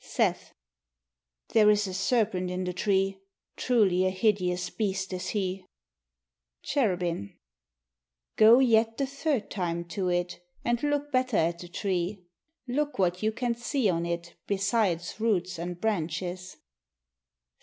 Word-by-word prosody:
Seth -, -, -1 dB, 0.9 s
There 215 Hz, -2 st, +5 dB
is 210 Hz, 0 st, +3 dB
a 190 Hz, -, -5 dB
serpent 195 Hz, -2 st, +1 dB
in 180 Hz, +1 st, -2 dB
the 180 Hz, 0 st, -3 dB
tree: 195 Hz, +1 st, +1 dB, 0.4 s
Truly 200 Hz, -7 st, +2 dB
a -, -, +3 dB
hideous 185 Hz, -3 st, 0 dB
beast 195 Hz, -3 st, -2 dB
is 185 Hz, 0 st, -4 dB
he. 190 Hz, -2 st, -2 dB, 1.0 s
Cherubin 180 Hz, -, -1 dB, 1.0 s
Go 220 Hz, +2 st, +8 dB
yet 225 Hz, -3 st, +3 dB
the 275 Hz, -, +1 dB
third 275 Hz, -4 st, -2 dB
time 170 Hz, -3 st, -2 dB
to 185 Hz, -1 st, -1 dB
it, 175 Hz, 0 st, -1 dB, 0.2 s
And 240 Hz, 0 st, +1 dB
look 290 Hz, 0 st, -1 dB
better 255 Hz, -4 st, +1 dB
at 170 Hz, +1 st, +1 dB
the 175 Hz, -, -8 dB
tree. 185 Hz, 0 st, -2 dB, 0.4 s
Look 290 Hz, +4 st, -1 dB
what 180 Hz, -2 st, +1 dB
you 215 Hz, 0 st, +1 dB
can 240 Hz, +2 st, -1 dB
see 235 Hz, -2 st, 0 dB
on 170 Hz, 0 st, -1 dB
it 170 Hz, 0 st, -4 dB
Besides 200 Hz, -3 st, 0 dB
roots 185 Hz, -6 st, 0 dB
and 175 Hz, +1 st, -5 dB
branches. 180 Hz, -2 st, -3 dB
195 Hz, 135 wpm, -28 LUFS, 180-225 Hz, 1.0 s, Go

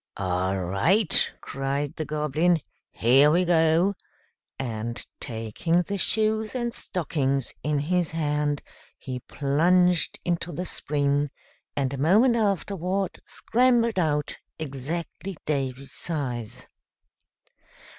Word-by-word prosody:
"All 95 Hz, 0 st, 0 dB
right!" 150 Hz, -, +3 dB
cried 135 Hz, +1 st, -3 dB
the 155 Hz, -, -3 dB
Goblin. 155 Hz, +3 st, +1 dB, 0.3 s
"Here 135 Hz, +6 st, +5 dB
we 175 Hz, +4 st, +3 dB
go;" 170 Hz, +2 st, +3 dB, 0.6 s
and, 120 Hz, -2 st, -4 dB
taking 115 Hz, +10 st, -1 dB
the 200 Hz, +2 st, -3 dB
shoes 220 Hz, +3 st, +1 dB
and 240 Hz, -2 st, -1 dB
stockings 140 Hz, -7 st, -1 dB
in 150 Hz, 0 st, 0 dB
his 175 Hz, +4 st, 0 dB
hand, 150 Hz, -2 st, -1 dB, 0.3 s
he 130 Hz, -1 st, -5 dB
plunged 170 Hz, +7 st, +2 dB
into 175 Hz, 0 st, -1 dB
the 175 Hz, +4 st, -4 dB
spring, 145 Hz, -3 st, 0 dB, 0.5 s
and 140 Hz, -2 st, 0 dB
a 135 Hz, -, -4 dB
moment 215 Hz, -, +5 dB
afterward 195 Hz, -3 st, -1 dB
scrambled 235 Hz, -3 st, +2 dB
out 150 Hz, -3 st, 0 dB, 0.2 s
exactly 160 Hz, +5 st, -5 dB
Davy's 135 Hz, -2 st, -2 dB
size. 125 Hz, -7 st, -4 dB
155 Hz, 105 wpm, -26 LUFS, 135-180 Hz, 0.6 s, Here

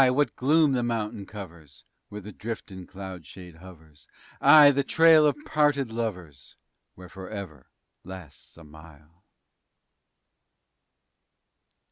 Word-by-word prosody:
what 140 Hz, +3 st, 0 dB
gloom 150 Hz, +3 st, +2 dB
the 130 Hz, -2 st, 0 dB
mountain 110 Hz, -4 st, -4 dB
covers_ 80 Hz, -, -12 dB, 0.3 s
Where 105 Hz, 0 st, -8 dB
the 105 Hz, +1 st, -11 dB
driftin' 95 Hz, -5 st, -8 dB
cloud 95 Hz, -3 st, -9 dB
shade 90 Hz, +2 st, -13 dB
hovers! 80 Hz, -4 st, -17 dB, 0.3 s
Ay! 150 Hz, -2 st, +8 dB
the 140 Hz, 0 st, 0 dB
trail 160 Hz, +1 st, +5 dB
o' 150 Hz, -, +3 dB
parted 145 Hz, -, 0 dB
lovers, 90 Hz, -, -6 dB, 0.4 s
_Where 90 Hz, 0 st, -12 dB
"forever" 95 Hz, -, -10 dB, 0.3 s
lasts 90 Hz, -6 st, -12 dB
a 85 Hz, -, -14 dB
mile! 80 Hz, +2 st, -18 dB
95 Hz, 110 wpm, -25 LUFS, 85-125 Hz, 0.4 s, Ay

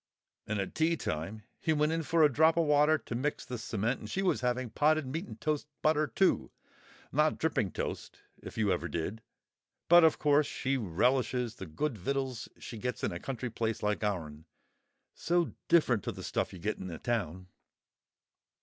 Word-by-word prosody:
And 110 Hz, -1 st, -1 dB
at 95 Hz, -, -3 dB
tea 165 Hz, +1 st, +2 dB
time 95 Hz, -, -4 dB, 0.2 s
he 160 Hz, -, +1 dB
went 150 Hz, +1 st, +2 dB
in 165 Hz, 0 st, 0 dB
for 160 Hz, +2 st, +3 dB
a 150 Hz, -3 st, +5 dB
drop 160 Hz, +4 st, +4 dB
o' 170 Hz, -, +4 dB
water 150 Hz, +1 st, +4 dB
to 135 Hz, -, -8 dB
mix 135 Hz, +5 st, -2 dB
the 125 Hz, -2 st, -5 dB
cement, 115 Hz, +2 st, -1 dB
and 105 Hz, -, -8 dB
she 195 Hz, -, -1 dB
was 180 Hz, -, +1 dB
having 125 Hz, -1 st, -1 dB
potted 155 Hz, +4 st, +2 dB
meat 160 Hz, +9 st, -4 dB
and -, -, -10 dB
toast—butter, 155 Hz, 0 st, 0 dB
too, 190 Hz, -, +2 dB, 0.6 s
not 150 Hz, +3 st, +2 dB
dripping 145 Hz, -11 st, 0 dB
toast, -, -, -5 dB, 0.2 s
if -, -, -9 dB
you 105 Hz, -3 st, +2 dB
ever 85 Hz, -1 st, -2 dB
did. 85 Hz, +7 st, -4 dB, 0.7 s
But, 175 Hz, 0 st, +8 dB
of 160 Hz, -, +5 dB
course, 145 Hz, 0 st, +3 dB
she 135 Hz, +1 st, -1 dB
relishes 125 Hz, +3 st, +1 dB
the 95 Hz, -, -7 dB
good 115 Hz, -, -2 dB
vittles 130 Hz, +2 st, -2 dB
she 115 Hz, -, -8 dB
gets 125 Hz, +2 st, -3 dB
in -, -, +1 dB
a 85 Hz, -, -5 dB
country 125 Hz, 0 st, -4 dB
place 115 Hz, -1 st, -2 dB
like 105 Hz, +1 st, 0 dB
ourn. 80 Hz, -7 st, -3 dB, 0.7 s
So 175 Hz, 0 st, 0 dB, 0.2 s
different 130 Hz, -, +4 dB
to -, -, -1 dB
the -, -, -9 dB
stuff -, -, -1 dB
you 95 Hz, -, -9 dB
get 105 Hz, +5 st, -3 dB
in 95 Hz, -, -6 dB
a 85 Hz, -, -6 dB
town." 95 Hz, -6 st, -2 dB
125 Hz, 185 wpm, -31 LUFS, 105-155 Hz, 0.7 s, But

